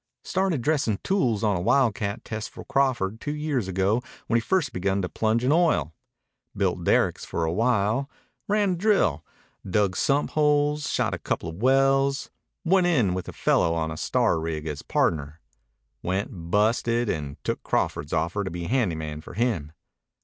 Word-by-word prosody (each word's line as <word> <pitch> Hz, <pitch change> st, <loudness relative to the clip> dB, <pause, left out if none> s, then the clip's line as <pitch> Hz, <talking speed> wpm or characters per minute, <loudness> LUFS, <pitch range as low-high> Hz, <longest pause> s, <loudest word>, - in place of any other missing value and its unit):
"Started 185 Hz, -9 st, 0 dB
dressin' 135 Hz, -8 st, +1 dB
tools 125 Hz, -, +1 dB
on 105 Hz, -2 st, +2 dB
a 85 Hz, -, -2 dB
wildcat 110 Hz, -2 st, +1 dB
test 110 Hz, +1 st, -5 dB
for -, -, -11 dB
Crawford 120 Hz, -6 st, 0 dB
two 145 Hz, -, -3 dB
years 150 Hz, -8 st, -1 dB
ago 95 Hz, +5 st, +1 dB, 0.2 s
when 115 Hz, -, +2 dB
he -, -, +1 dB
first 160 Hz, +3 st, 0 dB
begun 95 Hz, +2 st, 0 dB
to 90 Hz, -, -2 dB
plunge 110 Hz, +7 st, 0 dB
in 130 Hz, -, +2 dB
oil. 155 Hz, -, +2 dB, 0.6 s
Built -, -, 0 dB
derricks -, -, +2 dB
for 85 Hz, -, -2 dB
a 80 Hz, -, 0 dB
while. 115 Hz, +4 st, +1 dB, 0.4 s
Ran 205 Hz, -1 st, +2 dB
a -, -, 0 dB
drill. 175 Hz, -, +2 dB, 0.4 s
Dug 95 Hz, 0 st, +1 dB
sump 140 Hz, +1 st, +1 dB
holes. 150 Hz, -1 st, +2 dB
Shot -, -, 0 dB
a -, -, -3 dB
coupla 80 Hz, -, -3 dB
wells. 135 Hz, -, +2 dB, 0.3 s
Went 180 Hz, +1 st, +4 dB
in 125 Hz, -, +2 dB
with 95 Hz, 0 st, -4 dB
a -, -, -5 dB
fellow 85 Hz, -, +2 dB
on 80 Hz, -1 st, -1 dB
a -, -, -5 dB
star 80 Hz, -, +1 dB
rig 80 Hz, -1 st, -4 dB
as 75 Hz, -2 st, -4 dB
pardner. 75 Hz, -1 st, -1 dB, 0.6 s
Went 90 Hz, -2 st, -3 dB
busted 115 Hz, +4 st, +2 dB
and 75 Hz, -7 st, -3 dB
took -, -, -2 dB
Crawford's 75 Hz, -, -1 dB
offer 85 Hz, +5 st, 0 dB
to 95 Hz, -, -3 dB
be 85 Hz, 0 st, -5 dB
handy 105 Hz, -3 st, +1 dB
man 75 Hz, -1 st, -5 dB
for -, -, -11 dB
him. 105 Hz, -11 st, -1 dB
110 Hz, 170 wpm, -25 LUFS, 85-135 Hz, 0.6 s, Went